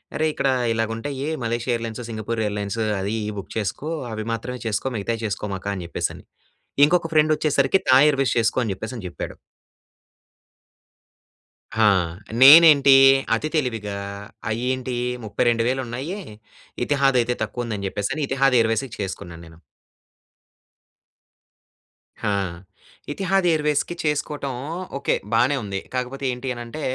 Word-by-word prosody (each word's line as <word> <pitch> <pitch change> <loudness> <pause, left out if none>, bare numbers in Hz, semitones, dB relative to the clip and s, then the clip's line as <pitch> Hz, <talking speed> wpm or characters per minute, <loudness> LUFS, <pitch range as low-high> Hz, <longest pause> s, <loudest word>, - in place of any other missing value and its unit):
"అరేయ్! 155 0 +1
ఇక్కడ 135 - 0 0.2
ఇలాగుంటయి 115 +6 -3 0.2
Malaysia 120 +2 -1
airlines, 115 +1 -5
Singapore 110 0 -3
airlines 105 +1 -3 0.2
అది 100 +3 -2 0.2
ఇవి - - -5
బుక్ - - -10
చేసుకో. 110 +8 -3 0.2
అవి 110 -1 -4
మాత్రమే 125 +2 -5
చేసుకో. 110 +5 -1
మిగతాయి 115 +3 -3
చేసుకోమాక" 100 -1 -4
అని 95 - -5
చెప్పేసని. - - -4 0.6
ఇంకొక 170 +1 +2
ఫ్రెండ్ 155 0 +4
వచ్చేసరికి 150 +3 +2
"థాయ్ 135 +3 +7
ఎయిర్‌వేస్ 135 -2 0
చేసుకో" 115 +3 +2
అని 110 - -2
చెప్పేసని 110 +1 -7
చెప్పాడు. 85 - -7 2.5
ఆ! - - +6 0.6
నేనేంటి 145 -1 +9 0.4
అతి 155 - -2
తెలివిగా 115 -8 -1 0.5
అయ్యేంటి 125 +2 -2 0.3
32000 120 +4 +1
ఉన్నాయి. 135 - -5 0.7
ఇతిహాద్ 135 -2 +2
అయితే 120 +1 -1
తక్కువుందని 110 -3 -4
చెప్పేసి 100 +4 -3
అని 155 - -2
ఇతిహాద్ 135 -2 +3
ఎయిర్‌వేస్‌కి 115 +2 0
చేసుకున్నాను 85 -3 -6
నేను. 80 0 -15 2.7
ఆ! - - +1 0.8
ఇతిహాద్ 195 +3 0
ఎయిర్‌వేస్‌కి 150 +2 0
చేసుకోవటం 150 -2 -2 0.4
ఓకే. 140 - 0 0.2
బానే 125 +5 +3
ఉంది. 100 -1 -3
కాకపోతే 130 +2 -3
ఏంటి 125 +1 -4
అనంటే 120 +6 -7
125 Hz, 120 wpm, -23 LUFS, 110-140 Hz, 2.7 s, నేనేంటి